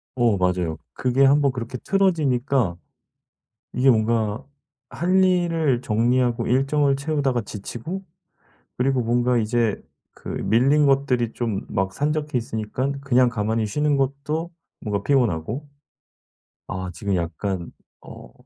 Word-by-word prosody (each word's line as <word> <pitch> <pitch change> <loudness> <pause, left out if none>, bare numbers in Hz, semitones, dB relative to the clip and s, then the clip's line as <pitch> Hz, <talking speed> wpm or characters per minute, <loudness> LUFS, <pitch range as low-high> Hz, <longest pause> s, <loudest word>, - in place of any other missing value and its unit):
어 120 -5 +2
맞아요. 90 -3 0 0.2
그게 130 +2 +1
1 140 +2 +5
번 140 -1 +3
그렇게 125 0 -5
틀어지니까 140 - +1 1.0
이게 130 +1 +4
뭔가 110 0 +1 0.4
할 185 +2 +2
일을 165 -8 +1
정리하고 120 +1 +1
일정을 135 +2 +2
채우다가 140 -4 0
지치고 120 - -6 0.7
그리고 130 +1 +1
뭔가 120 +1 +2
이제 115 -1 0 0.3
그 - - -13
밀린 135 +7 +2
것들이 130 -4 +1
좀 115 -5 -3
막 95 0 -1
산적해 150 0 -1
있으니깐 120 +4 -3
그냥 130 -2 +3
가만히 110 -1 -1
쉬는 150 +7 +1
것도 140 +5 -2 0.3
뭔가 100 -3 -2
피곤하고 120 - 0 1.0
아 95 -1 -4
지금 100 0 -2
약간 85 +1 -3 0.3
어 60 - -12
125 Hz, 255 characters per minute, -23 LUFS, 110-140 Hz, 1.0 s, 1